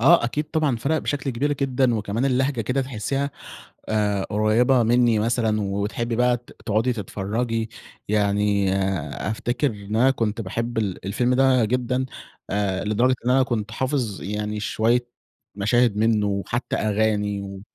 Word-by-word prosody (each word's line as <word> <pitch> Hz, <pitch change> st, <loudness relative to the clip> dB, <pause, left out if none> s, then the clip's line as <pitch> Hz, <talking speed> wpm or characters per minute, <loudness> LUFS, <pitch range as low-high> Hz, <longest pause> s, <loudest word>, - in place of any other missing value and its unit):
آه 165 Hz, +4 st, +6 dB
أكيد 135 Hz, +6 st, -1 dB
طبعًا 155 Hz, -6 st, +1 dB
فرق 145 Hz, +7 st, 0 dB
بشكل 140 Hz, -2 st, -2 dB
كبير 140 Hz, +4 st, 0 dB
جدًا، 130 Hz, -3 st, +1 dB
وكمان 105 Hz, +3 st, -1 dB
اللهجة 130 Hz, -1 st, +1 dB
كده 125 Hz, +5 st, 0 dB
تحسيها 135 Hz, +3 st, -2 dB, 0.6 s
آآ 105 Hz, -2 st, +1 dB
قريبة 115 Hz, +5 st, +3 dB
منّي 120 Hz, -1 st, +3 dB
مثلًا، 110 Hz, -1 st, +1 dB
وتحبي 105 Hz, +4 st, -2 dB
بقى 125 Hz, +1 st, +3 dB
ت 120 Hz, -, -19 dB
تقعدي 115 Hz, +3 st, +1 dB
تتفرجي. 110 Hz, +2 st, -2 dB, 0.4 s
يعني 100 Hz, -1 st, +2 dB, 0.6 s
أفتكر 120 Hz, +5 st, 0 dB
إن 105 Hz, 0 st, -6 dB
أنا 130 Hz, +4 st, +5 dB
كنت 115 Hz, -3 st, -2 dB
باحب 115 Hz, +4 st, -3 dB
ال 100 Hz, -4 st, -2 dB
الفيلم 120 Hz, +6 st, +1 dB
ده 130 Hz, -2 st, +4 dB
جدًا 125 Hz, +3 st, 0 dB, 0.4 s
آآ 100 Hz, -2 st, -1 dB
لدرجة 120 Hz, +5 st, +2 dB
إن -, -, +2 dB
أنا 130 Hz, +1 st, +5 dB
كنت 110 Hz, -4 st, -2 dB
حافظ 125 Hz, -4 st, -2 dB
يعني 105 Hz, +2 st, -3 dB
شوية 120 Hz, +3 st, +1 dB, 0.5 s
مشاهد 110 Hz, +2 st, +2 dB
منه 110 Hz, -1 st, +2 dB
وحتى 100 Hz, +5 st, -2 dB
أغاني 105 Hz, -1 st, 0 dB
و 100 Hz, -1 st, -8 dB
115 Hz, 145 wpm, -23 LUFS, 105-125 Hz, 0.6 s, آه